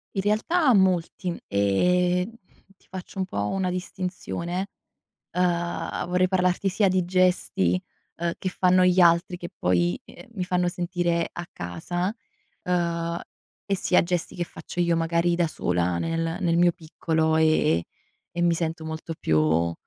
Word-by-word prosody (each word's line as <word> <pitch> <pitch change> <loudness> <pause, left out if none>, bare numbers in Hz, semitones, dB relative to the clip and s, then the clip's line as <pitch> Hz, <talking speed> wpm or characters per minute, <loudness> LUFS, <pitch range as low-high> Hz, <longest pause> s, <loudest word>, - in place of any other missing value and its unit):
In 195 - +1
realtà 255 - +2
molti, 185 -2 +1
ehm, 180 - +2 0.5
ti - - -30
faccio 190 +1 -9
un 190 - 0
po' 100 - -2
una 190 -1 -1
distinzione, 180 0 -4 0.7
uhm, 175 -1 -1
vorrei 180 +1 +3
parlarti 185 +1 +1
sia 200 +1 +2
di 185 -1 +1
gesti, 180 - +2 0.4
uhm, 170 0 -1
che 190 - -2
fanno 185 0 +3
gli 180 0 +3
altri 175 +1 +4
che 175 -1 -8
poi, 90 -1 +1
ehm, 260 - -14
mi 185 -5 -3
fanno 180 0 +1
sentire 175 -1 -1
a 175 - -6
casa, 175 - -3 0.5
uhm, 170 -1 -1 0.5
e 195 - 0
sia 185 - +3
gesti 175 -1 -2
che 175 - -2
faccio 165 +2 -7
io 170 -1 +2
magari 170 +1 +1
da 170 0 +2
sola 90 - -1
nel 165 - -2
nel 170 -3 +1
mio 175 0 +4
piccolo, 160 -1 -1
ehm, 155 - +3 0.5
e 175 - -3
mi 175 -1 +4
sento 165 -1 -2
molto 160 +1 -5
più 80 +2 +2
175 Hz, 150 wpm, -25 LUFS, 165-180 Hz, 0.7 s, altri